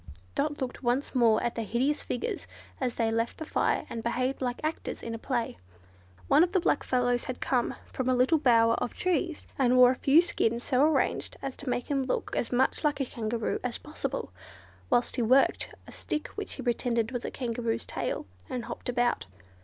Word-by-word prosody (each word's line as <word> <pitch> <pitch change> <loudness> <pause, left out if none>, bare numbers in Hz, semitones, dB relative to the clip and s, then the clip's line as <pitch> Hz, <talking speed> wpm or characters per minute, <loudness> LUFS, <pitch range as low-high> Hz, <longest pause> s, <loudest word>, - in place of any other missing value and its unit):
Dot 295 0 -1
looked 260 -2 -4
once 255 +2 0
more 230 -4 +4
at 240 - 0
the 230 - -3
hideous 250 +7 0
figures 245 - -3 0.3
as 255 -3 -1
they 225 -1 +1
left 230 +1 -1
the 315 - -5
fire - - +1
and 230 - -5
behaved 255 +4 -1
like 245 -1 -1
actors 310 +1 -3
in 230 - -4
a 225 - -5
play. 235 - -2 0.7
One 315 - +6
of 360 +2 0
the 380 - +4
black 340 - +1
fellows 245 -1 +1
had 255 -1 -5
come 250 -3 0
from 260 -1 -3
a 255 - +4
little 260 +6 +4
bower 230 -4 +5
of - - -3
trees, 350 -3 -1
and 255 -1 +4
wore 250 0 +8
a - - -1
few 280 +5 +5
skins 235 -8 0
so 260 -2 +2
arranged 310 +1 +1
as 270 -1 -3
to 285 - -5
make 245 - -1
him 280 -2 0
look 255 - -2
as - - -1
much 255 +5 +2
like 295 -1 +1
a 270 - +1
Kangaroo 230 -1 -2
as 250 -2 -2
possible, 300 +1 -5 0.6
whilst 245 +2 +2
he - - +2
worked 255 +4 +3
a - - -12
stick 300 - -4
which 415 -1 -6
he 265 - -7
pretended 235 -1 0
was 245 -2 -3
a - - -3
Kangaroo's 235 -2 -2
tail, - - -3 0.2
and 245 -2 -3
hopped - - -6
about. 245 -1 +1
250 Hz, 205 wpm, -29 LUFS, 235-275 Hz, 0.7 s, wore